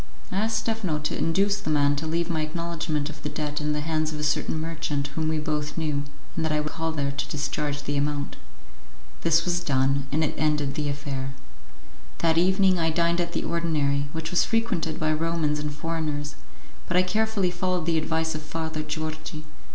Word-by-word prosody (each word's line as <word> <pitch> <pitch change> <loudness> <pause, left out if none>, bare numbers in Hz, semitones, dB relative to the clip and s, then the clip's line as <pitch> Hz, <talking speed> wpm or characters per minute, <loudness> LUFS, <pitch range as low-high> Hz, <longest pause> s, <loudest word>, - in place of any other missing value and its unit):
I - - -1
asked 220 +2 +2
Stephano 220 -8 0
to 150 0 -2
induce 200 +5 +2
the - - -3
man 145 -1 +4
to 160 +2 -2
leave 165 +1 +1
my 165 -3 0
acknowledgement 160 -1 -1
of 150 -1 -12
the 150 - -2
debt 150 -1 -2
in 150 0 0
the 150 - -1
hands 155 0 0
of 150 - -4
a - - -2
certain 150 +1 +1
merchant 155 -3 -2
whom 155 +3 -1
we 160 0 +1
both 150 0 -2
knew, 150 -3 0 0.3
and 165 - 0
that 160 - +1
I 150 - +2
would 150 0 -2
call 165 0 -1
there 140 -3 0
to 140 0 -3
discharge 145 0 -1
the 145 0 -1
amount. 145 0 -1 0.9
This 165 0 +4
was 175 -1 +2
done, 140 -1 +2
and 155 +3 +2
it 150 - +1
ended 150 -2 +2
the 145 0 -1
affair. 140 -2 -3 0.8
That 165 -1 +3
evening 190 0 +4
I 165 -1 +3
dined 170 +2 +2
at 170 0 -2
the - - 0
ordinary, 145 -4 +1
which 160 0 -4
was 180 - +5
frequented 225 -9 0
by 155 0 +2
Romans 155 -1 +1
and 150 0 -2
foreigners; 150 -1 -2 0.5
but - - +2
I 180 - +6
carefully 210 -1 +1
followed 180 -1 0
the 165 -1 +3
advice 160 +1 0
of 155 - -4
Father 160 0 -3
Georgi. 155 0 -4
155 Hz, 200 wpm, -26 LUFS, 150-170 Hz, 0.9 s, I